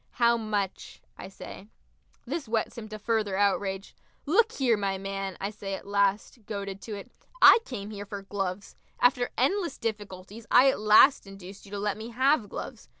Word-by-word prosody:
"How 235 -1 +3
much?" 210 -4 -3 0.2
I - - -9
say. 195 +1 -11 0.6
This 280 +2 -4
whets 220 0 -1
him 215 -2 -8
to 215 - -6
further 215 -2 -1
outrage. 195 -1 0 0.3
"Look 440 +9 +3
here, 255 - +2
my 195 -2 -2
man!" 195 -1 -5
I 200 +2 -3
say 200 -2 -5
at - - -10
last, 200 +3 0
goaded 200 -2 -5
to 215 - -6
it, 200 - -10 0.3
"I - - +9
came 210 -5 -6
here 205 -1 -7
for 200 -1 -7
gloves. 195 -1 -4 0.2
After 245 0 +3
endless 335 - 0
difficulties 205 0 -6
I 265 +2 +6
at - - -5
last 215 +4 +6
induced 195 0 -11
you - - -15
to - - -3
let 205 0 -2
me 220 +2 -7
have 260 -2 +2
gloves. - - -8
210 Hz, 180 wpm, -27 LUFS, 195-235 Hz, 0.6 s, I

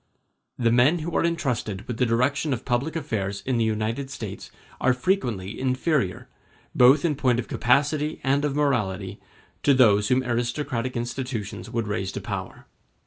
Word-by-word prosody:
The 115 -2 +2
men 125 +8 +4
who 165 +1 -4
are - - +2
entrusted 125 - -2
with 120 - -4
the 125 - +2
direction 135 +5 +1
of 120 - -5
public 130 +7 -1
affairs 105 -10 -3
in 130 -2 0
the - - +3
United 110 +5 -1
States 110 -8 -7 0.3
are 130 - +3
frequently 120 - -1
inferior, 130 - 0 0.5
both 135 +5 +6
in 160 - +2
point 130 -4 +2
of 120 - -3
capacity 145 +5 +1
and 140 +2 +2
of 145 -2 -1
morality, 105 -9 -1 0.4
to 140 - +4
those 105 -5 +5
whom 130 +2 +2
aristocratic 120 0 -2
institutions 120 -3 -4
would 115 -2 -2
raise 95 -2 -2
to - - -3
power. - - -6
125 Hz, 160 wpm, -25 LUFS, 110-140 Hz, 0.5 s, both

